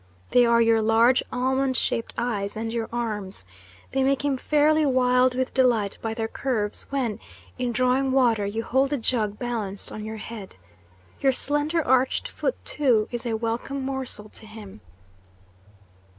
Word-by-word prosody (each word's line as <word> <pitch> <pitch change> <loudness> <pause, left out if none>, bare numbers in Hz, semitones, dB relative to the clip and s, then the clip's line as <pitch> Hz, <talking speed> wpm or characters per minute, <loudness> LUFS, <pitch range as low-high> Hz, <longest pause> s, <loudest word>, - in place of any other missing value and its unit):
They 245 -1 +5
are 235 0 +4
your 225 -1 +3
large 225 +3 +4
almond 260 +1 0
shaped 230 - -1
eyes 215 -4 -2
and 225 +1 -3
your 230 -1 -2
arms. 210 - -4 0.5
They 270 - 0
make 275 +1 +1
him 280 -2 +1
fairly 300 +3 +3
wild 255 -2 +3
with 260 0 -1
delight 235 -6 +2
by 225 -1 -3
their 225 -1 -2
curves 225 -4 -2
when, 255 -7 -2 0.4
in 245 -1 0
drawing 255 +2 +1
water, 240 -5 +3
you 210 +3 -2
hold 265 +4 +1
the 290 - 0
jug 220 -4 -1
balanced 220 -5 -4
on 215 - -6
your 220 +1 -6
head. 215 -2 -8 0.6
Your 270 -1 +3
slender 295 +4 +1
arched 260 +1 +2
foot, - - -2
too, 240 -7 +2
is 240 0 -4
a 225 -1 -1
welcome 235 +5 -3
morsel 260 -6 -2
to 220 - -10
him." 215 - -11
240 Hz, 160 wpm, -25 LUFS, 220-265 Hz, 0.6 s, They